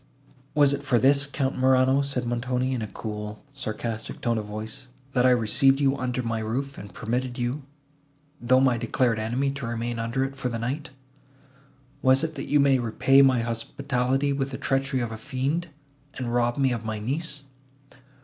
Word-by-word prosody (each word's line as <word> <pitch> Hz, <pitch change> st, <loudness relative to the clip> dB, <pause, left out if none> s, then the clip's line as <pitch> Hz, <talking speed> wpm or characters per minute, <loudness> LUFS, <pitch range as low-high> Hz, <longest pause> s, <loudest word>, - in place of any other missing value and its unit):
"Was 145 Hz, -2 st, +5 dB
it 140 Hz, -, -2 dB
for 135 Hz, -3 st, +2 dB
this, 140 Hz, +3 st, +3 dB
Count 140 Hz, -1 st, -1 dB
Morano," 130 Hz, +1 st, +4 dB
said 135 Hz, -3 st, -2 dB
Montoni, 125 Hz, +2 st, -1 dB
in 125 Hz, -, -2 dB
a 110 Hz, -, -3 dB
cool 105 Hz, +1 st, -6 dB
sarcastic 110 Hz, -3 st, -5 dB
tone 115 Hz, -2 st, 0 dB
of 105 Hz, -, -6 dB
voice, 110 Hz, +5 st, -6 dB, 0.3 s
"that 125 Hz, -1 st, +4 dB
I -, -, +6 dB
received 125 Hz, +3 st, +4 dB
you 140 Hz, -1 st, +3 dB
under 125 Hz, -1 st, -2 dB
my 115 Hz, -1 st, -1 dB
roof, 130 Hz, +6 st, -3 dB
and 100 Hz, -1 st, -9 dB
permitted 120 Hz, +5 st, -3 dB
you, 125 Hz, +4 st, -2 dB, 0.8 s
though 130 Hz, +2 st, +4 dB
my 130 Hz, -3 st, +3 dB
declared 115 Hz, 0 st, +1 dB
enemy, 125 Hz, +6 st, 0 dB
to 140 Hz, -3 st, -5 dB
remain 115 Hz, 0 st, -3 dB
under 115 Hz, +4 st, -1 dB
it 135 Hz, 0 st, -3 dB
for 135 Hz, -2 st, -2 dB
the 115 Hz, -, -3 dB
night? 130 Hz, +6 st, -3 dB, 1.1 s
Was 130 Hz, +3 st, +4 dB
it, 160 Hz, -1 st, -2 dB
that -, -, -6 dB
you 150 Hz, -, +4 dB
might 135 Hz, -2 st, +4 dB
repay 135 Hz, +4 st, +4 dB
my 130 Hz, -3 st, +4 dB
hospitality 130 Hz, +3 st, -1 dB
with 135 Hz, 0 st, -1 dB
the 130 Hz, -, -5 dB
treachery 135 Hz, -1 st, 0 dB
of 120 Hz, -1 st, -3 dB
a 110 Hz, -, -6 dB
fiend, 140 Hz, +7 st, -2 dB, 0.5 s
and 120 Hz, -2 st, -3 dB
rob 120 Hz, +1 st, +1 dB
me 135 Hz, -2 st, +3 dB
of 115 Hz, -2 st, -2 dB
my 110 Hz, -1 st, -3 dB
niece?" 145 Hz, +6 st, -3 dB
130 Hz, 185 wpm, -26 LUFS, 115-135 Hz, 1.1 s, I